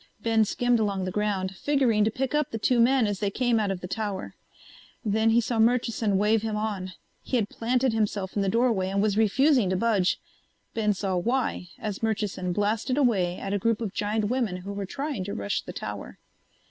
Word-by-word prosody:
Ben 225 -1 +3
skimmed 245 +2 +1
along 200 -3 0
the 185 - -3
ground, 195 -2 -1
figuring 255 -5 +2
to 215 - +3
pick 260 +4 -3
up 300 -1 +1
the 225 - -4
two 240 +3 +2
men 250 +1 +4
as 205 -2 -2
they 205 - 0
came 240 +1 +1
out 210 -2 0
of 190 -2 -3
the 180 - -5
tower. 205 -1 -4 0.7
Then 220 +2 +2
he 225 +1 +5
saw 235 0 -1
Murchison 225 -3 +2
wave 210 +2 +3
him 220 -1 -2
on. 205 -4 -3 0.3
He - - -3
had 215 -4 +1
planted 250 +1 0
himself 205 -3 -1
in 205 - +1
the 195 - +1
doorway 230 -4 +2
and 195 +1 0
was 205 0 +2
refusing 235 +1 +3
to 185 - +1
budge. 200 -4 +2 0.5
Ben 210 -2 +1
saw 190 -1 -2
why 235 -1 -1
as 210 -3 -5
Murchison 210 -5 -1
blasted 215 +7 0
away 195 -10 +2
at 195 - -4
a 205 - +1
group 230 +2 +1
of 215 -5 -4
giant 210 +1 -1
women 230 -5 -1
who 195 +3 -7
were 200 -1 -4
trying 275 -3 -3
to 200 - -4
rush 100 0 -2
the - - -8
tower. - - -6
215 Hz, 210 wpm, -26 LUFS, 195-235 Hz, 0.7 s, he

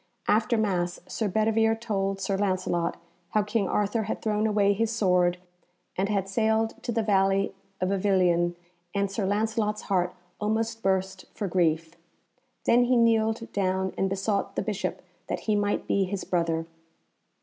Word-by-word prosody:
After 215 +2 +3
Mass 180 -5 0
Sir 220 - -2
Bedivere 225 +2 +2
told 195 -4 -2
Sir 195 0 -1
Lancelot 185 -3 0 0.4
how 215 - +4
King 210 -1 0
Arthur 210 +2 +1
had 220 - -3
thrown 215 0 0
away 205 -1 +3
his 225 +2 0
sword 180 -5 +2 0.6
and 195 +2 0
had 195 -2 0
sailed 220 +2 0
to 240 - -3
the 225 -1 0
valley 195 -1 +2 0.3
of 185 - 0
Avilion, 185 -3 +2 0.4
and 200 -1 0
Sir 195 -1 -1
Lancelot's 215 +1 0
heart 185 -3 0 0.2
almost 225 +2 -1
burst 190 -1 0
for 205 - -2
grief. 165 -2 +1 0.7
Then 245 +1 +5
he 250 +1 +3
kneeled 225 0 +2
down 190 -1 0
and 195 - 0
besought 195 +1 -1
the - - -1
Bishop 205 -1 -3 0.2
that - - -3
he 215 - +1
might 205 0 0
be 195 -1 +2
his 195 +1 -4
brother. 165 -2 0
200 Hz, 155 wpm, -27 LUFS, 190-220 Hz, 0.7 s, Then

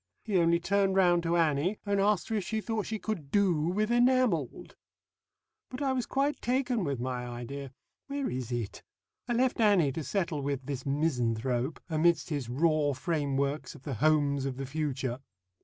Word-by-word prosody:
He 210 - -2
only 170 0 +3
turned 195 +2 +1
round 175 -2 +4
to 170 0 +1
Annie, 165 +4 +1
and 200 -1 +1
asked 205 0 +1
her 225 - 0
if 205 - -1
she 220 +4 -2
thought 220 -1 -2
she 220 - -2
could 195 -10 -4
do 195 0 +3
with 210 +5 0
'enamelled.' 240 - +2 0.9
But 255 +3 -5
I 270 -1 +1
was 250 -2 -2
quite 280 +2 0
taken 250 -3 0
with 140 -6 -2
my 125 0 -3
idea 125 +3 -6 0.4
Where 280 -1 -2
is 125 -1 -4
it? 120 -4 -3 0.5
I 240 - 0
left 250 +1 +1
Annie 195 -10 +4
to 160 +4 -4
settle 170 -4 -1
with 140 -1 -3
this 135 -1 -5
misanthrope, 130 -2 0
amidst 170 +1 +2
his 140 -6 -2
raw 150 +2 +2
frameworks 140 0 -1
of 140 - -14
the 140 - -4
Homes 140 +1 +2
of 130 -2 -3
the 135 - -4
Future." 135 -3 -2
160 Hz, 175 wpm, -30 LUFS, 135-205 Hz, 0.9 s, round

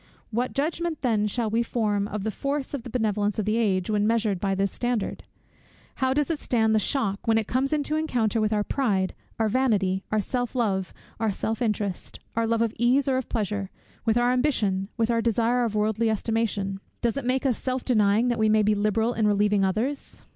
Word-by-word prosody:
What 245 +3 -1
judgment 315 +2 -2
then 215 -4 +2
shall 230 +2 -1
we 230 +2 +2
form 210 -4 0
of 210 -1 -4
the 220 - -1
force 275 +5 -3
of 280 - -3
the 240 - -9
benevolence 210 -3 0
of 215 - -1
the 215 +1 +1
age, 190 -5 +1
when 210 -1 +1
measured 220 -4 +1
by 195 +1 0
this 195 0 0
standard? 240 -4 -2 0.7
How 260 -1 +1
does 295 +4 +1
it 315 - -2
stand 220 -3 +1
the 215 - +4
shock, 210 -3 -1
when 225 0 +4
it 220 - +1
comes 260 +5 0
into 305 0 0
encounter 240 -8 0
with 215 0 +1
our 210 -1 +1
pride, 205 -8 0 0.2
our 225 - +2
vanity, 205 -6 +1
our 215 - +2
self 245 +4 -2
love, 195 -7 0 0.3
our 220 -1 +1
self 220 +4 -3
interest, 205 -5 -2 0.2
our 230 0 +1
love 230 0 +2
of 230 -1 -1
ease 255 +4 +3
or 265 -1 +2
of 260 - -4
pleasure, 205 -3 -2 0.3
with 225 0 +2
our 240 +1 +3
ambition, 215 -8 +1
with 230 0 +1
our 230 0 +2
desire 235 +2 +2
of 220 -2 -3
worldly 220 +2 +1
estimation? 215 -3 -1 0.2
Does 235 0 +1
it 280 - -3
make 255 +2 0
us 255 -3 +3
self 255 -1 -2
denying, 215 0 +3
that 240 - 0
we 220 0 +3
may 215 0 +4
be 210 +1 +3
liberal 215 +3 +1
in 220 -3 +1
relieving 205 -1 +2
others? 225 +9 -2
225 Hz, 210 wpm, -26 LUFS, 210-245 Hz, 0.7 s, the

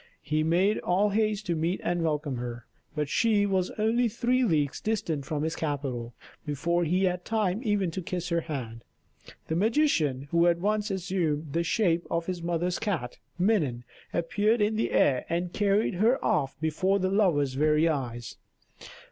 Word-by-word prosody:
He 155 +1 0
made 180 +6 +2
all 195 +4 +2
haste 215 0 0
to 170 - 0
meet 165 +4 -1
and 175 0 0
welcome 150 -4 -1
her; 120 -1 -6 0.3
but 150 - -1
when - - +1
she 205 +7 +2
was 190 -2 0
only 230 +3 +2
three 245 +4 +1
leagues 155 - 0
distant 170 -10 -2
from 150 -2 -2
his 160 0 -1
capital, 130 -6 -3 0.3
before 170 +4 0
he 180 +4 +1
had 180 -1 0
time 215 -1 0
even 205 -6 0
to 185 - -4
kiss 175 0 -4
her 170 -1 +1
hand, 120 -8 -6 0.6
the 160 - -1
magician 170 - +1
who 170 0 +4
had 170 -1 +3
once 210 +3 0
assumed 170 -6 -2
the 170 - +1
shape 170 -2 +1
of 170 0 -1
his 180 -1 -4
mother's 175 +1 -1
cat, 160 - -3 0.2
Minon, 170 - +1 0.3
appeared 205 +7 +1
in 210 +1 +1
the 220 - 0
air 130 -3 +3
and 175 +1 -2
carried 205 +1 +2
her 220 +8 +3
off 145 -12 0
before 175 +5 +1
the 185 -1 0
lover's 165 -10 +2
very 150 +3 +3
eyes. 120 -6 -3
175 Hz, 175 wpm, -28 LUFS, 150-205 Hz, 0.6 s, who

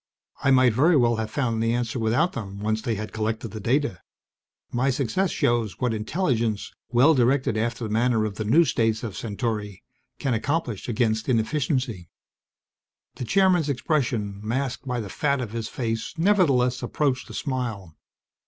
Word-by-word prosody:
I 135 - +3
might 130 -3 +5
very 155 +7 +4
well 120 -3 +3
have 110 -1 -2
found 115 -3 -1
the 115 0 +1
answer 120 0 -2
without 120 +11 +1
them, 100 -3 -6
once 110 +1 -1
they 115 -1 -1
had 110 +1 -6
collected 110 +1 -2
the 110 - -7
data. 120 - 0 0.7
My 125 +3 +1
success 140 - 0
shows 120 -7 0
what 125 -3 0
intelligence, 115 - -1 0.2
well 130 +7 +5
directed 130 -2 +2
after 115 +2 -1
the 110 - -3
manner 115 0 +2
of 105 - -3
the 110 - -2
new 145 +11 +5
states 110 -4 0
of 110 -4 -5
Centauri, 105 -2 -4 0.3
can 135 -3 -1
accomplish 125 - -2
against 110 0 0
inefficiency." 125 - 0 1.1
The 125 - -4
Chairman's 180 - +3
expression, 120 -8 -1
masked 130 +4 -2
by 125 -2 -1
the 105 - -6
fat 140 +7 0
of 120 -5 -4
his 115 -1 -4
face, 115 -3 -3
nevertheless 145 -10 +3
approached 130 +1 -1
a - - -8
smile. 115 - -4
120 Hz, 160 wpm, -25 LUFS, 110-135 Hz, 1.1 s, might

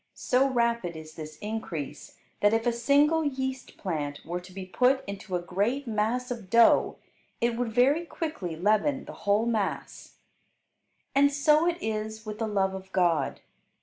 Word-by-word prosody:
So 260 +2 +2
rapid 235 -8 0
is 155 0 -10
this 155 -1 -9
increase, 205 -9 -5 0.2
that 205 +2 +4
if 225 +1 -1
a 240 - +2
single 290 +7 +3
yeast 265 -2 -3
plant 150 -6 -4
were 175 +2 -3
to 180 +1 -14
be 190 0 -7
put 255 +7 +2
into 200 -1 -5
a 175 - -1
great 215 +11 -1
mass 235 +3 -1
of 225 -6 -6
dough 235 +2 +5 0.4
it 235 -1 +1
would 240 -1 -2
very 280 +9 +3
quickly 300 - -4
leaven 215 - +1
the - - -9 0.2
whole 210 +3 +4
mass. 220 -4 -3 1.0
And 285 0 +5
so 300 +3 +3
it 345 -1 +1
is 220 0 -3
with 215 0 -6
the 225 - -1
love 195 -2 +1
of 190 0 -8
God. 175 -4 +1
220 Hz, 165 wpm, -27 LUFS, 190-260 Hz, 1.0 s, dough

